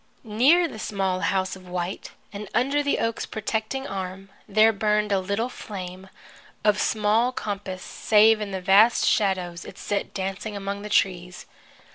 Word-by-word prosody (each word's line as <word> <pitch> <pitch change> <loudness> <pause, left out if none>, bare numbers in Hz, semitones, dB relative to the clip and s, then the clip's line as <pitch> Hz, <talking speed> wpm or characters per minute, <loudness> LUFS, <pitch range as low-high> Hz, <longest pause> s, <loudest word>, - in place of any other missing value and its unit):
Near 265 +11 +4
the 220 - -9
small 195 -3 -1
house 190 0 0
of 185 -1 -14
white, 180 +1 -4 0.2
and 205 0 -7
under 275 +5 +2
the 285 -1 0
oak's 230 0 -2
protecting 220 +5 -3
arm, 195 -2 -6 0.2
there 220 +2 +5
burned 210 0 +1
a 195 - +3
little 200 +5 -1
flame, 190 -5 -8 0.5
of 210 -1 +3
small 220 +3 +2
compass 200 -5 -5
save 215 0 +4
in 210 - -3
the 190 -1 -4
vast 200 +6 +5
shadows 185 -4 0
it - - -11
set 205 - -3
dancing 195 +2 -4
among 200 0 -4
the 210 - -7
trees. 180 -3 0
205 Hz, 155 wpm, -25 LUFS, 190-220 Hz, 0.5 s, there